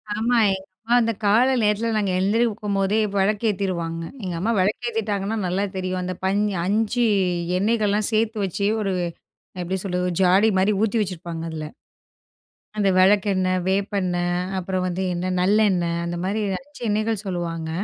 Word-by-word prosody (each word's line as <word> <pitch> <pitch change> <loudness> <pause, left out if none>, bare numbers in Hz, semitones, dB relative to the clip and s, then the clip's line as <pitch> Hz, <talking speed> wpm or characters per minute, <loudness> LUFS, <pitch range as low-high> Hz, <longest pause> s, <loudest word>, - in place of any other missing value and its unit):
ஆமா. 235 +3 +1 0.2
எங்க 190 0 -10 0.2
அம்மா, 235 +2 +2
அந்த 230 0 +1
கால 220 +6 +4 0.2
நேரத்தில 210 +2 +1
நாங்க 200 -3 0
எழுந்திரிக்கும்போதே 210 -1 +1 0.2
விளக்கு 205 +3 +1
ஏத்திருவாங்க. 170 -4 -2 0.2
எங்க 180 - -3
அம்மா 215 +6 0
விளக்கு 210 +6 0
ஏத்திட்டாங்கன்னா 215 -1 -2
நல்லா 190 +3 0
தெரியும். 185 0 -2
அந்த 185 0 -3
பஞ் 195 +2 +2 0.2
5 220 +4 +1 0.5
எண்ணெய்கள்லாம் 210 0 +1
சேர்த்து 220 0 +1
வச்சு 200 +2 -1
ஒரு 195 -2 -1 0.6
அ - - -5
எப்பிடி 185 +2 -2
சொல்றது? 180 -2 -1
ஒரு 175 - -4
ஜாடிமாரி 190 +2 +4
ஊத்தி 220 +1 +1
வச்சிருப்பாங்க, 170 -4 -5
அதில. 155 -1 -5 1.1
அந்த 205 -2 +2
விளக்கெண்ணெய், 185 -1 +3
வேப்பெண்ணெய், 185 -2 0 0.2
அப்பறம் 185 0 -2
வந்து 180 +1 -2
என்ன, 180 +1 -2
நல்லெண்ணெய். 185 -3 +2
அந்தமாரி 180 +5 -2 0.2
5 290 +4 -15
எண்ணெய்கள் 215 0 0
சொல்லுவாங்க. 170 -3 -3
195 Hz, 140 wpm, -23 LUFS, 185-215 Hz, 1.1 s, கால